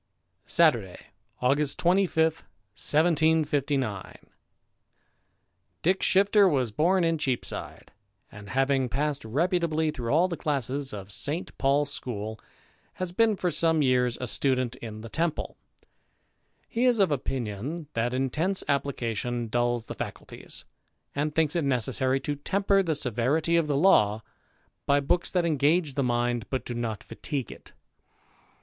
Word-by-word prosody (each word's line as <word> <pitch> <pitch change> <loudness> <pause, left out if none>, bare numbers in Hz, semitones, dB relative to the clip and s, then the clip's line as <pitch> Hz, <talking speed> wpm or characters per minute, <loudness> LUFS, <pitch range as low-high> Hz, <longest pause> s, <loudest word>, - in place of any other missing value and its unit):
Saturday, 120 - +2 0.4
August 140 +3 +2
25, 175 -2 +3 0.5
1759. 150 - +1 1.7
T^ICK 185 +3 +2
SHIFTER 200 +1 +4
was 130 -7 0
bora 175 - +2
in 165 -1 +1
Cheapside, 130 -4 -4 0.4
and, 100 -1 -11
having 135 -1 +1
passed 145 +2 -1
reputably 160 +5 0
through 120 -6 -4
all 165 +5 +4
the 175 - -4
classes 140 -3 -2
of 100 -1 -8
St 150 - -1
Paul's 140 +1 +2
school, 110 -4 -5 0.5
has 185 -1 -4
been 220 +3 +3
for 180 -2 -1
some 160 -2 +2
years 125 -2 +2
a 125 - -3
student 130 0 0
in 110 -3 -8
the 115 - -8
Temple. 170 -2 -2 1.1
He 235 +2 0
is 245 -2 +4
of 195 -6 +3
opinion, 130 +3 -3
that 115 +1 0
intense 150 +9 0
application 120 -4 -2
dulls 120 0 0
the - - -6
faculties, - - -8 0.5
and 150 +1 -2
thinks 160 -1 +1
it 170 - +1
necessary 130 0 0
to 145 +1 -2
temper 195 +5 +1
the 165 -4 -1
severity 140 +6 0
of 165 -2 +2
the 145 -2 0
law 110 - +4 0.6
by 140 0 +4
books 175 +5 0
that 180 -2 +1
engage 155 0 +2
the 140 - -1
mind, 120 -3 0
but 130 - -3
do 120 - -4
not 115 -3 -4
fatigue 135 -5 -5
it. - - -14
140 Hz, 135 wpm, -27 LUFS, 120-165 Hz, 1.7 s, SHIFTER